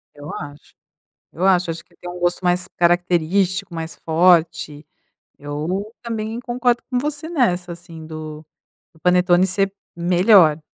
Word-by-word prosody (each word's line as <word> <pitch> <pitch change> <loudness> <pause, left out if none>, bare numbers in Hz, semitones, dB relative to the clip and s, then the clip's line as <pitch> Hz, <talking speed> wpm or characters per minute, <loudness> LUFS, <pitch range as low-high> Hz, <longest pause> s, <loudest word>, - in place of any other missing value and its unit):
Eu 145 +1 -9
acho 145 0 -9 0.6
eu 180 - -2
acho. 180 -2 +3
Acho 165 +1 -7
que - - -28
tem 180 - -9
um 180 0 -7
gosto 175 +1 0
mais 180 0 +1
característico, 175 +2 +1
mais 165 0 -5
forte. 160 -3 +2 0.5
Eu 155 +9 -4
também 225 -1 -4
concordo 245 0 0
com 250 - 0
você 295 +3 -3
nessa 180 - 0
assim 170 -2 -11
do 155 -1 -8 0.5
do 160 - -23
panetone 180 +1 +4
ser 195 +1 0 0.2
melhor. 175 -2 +5
175 Hz, 140 wpm, -21 LUFS, 160-195 Hz, 0.6 s, melhor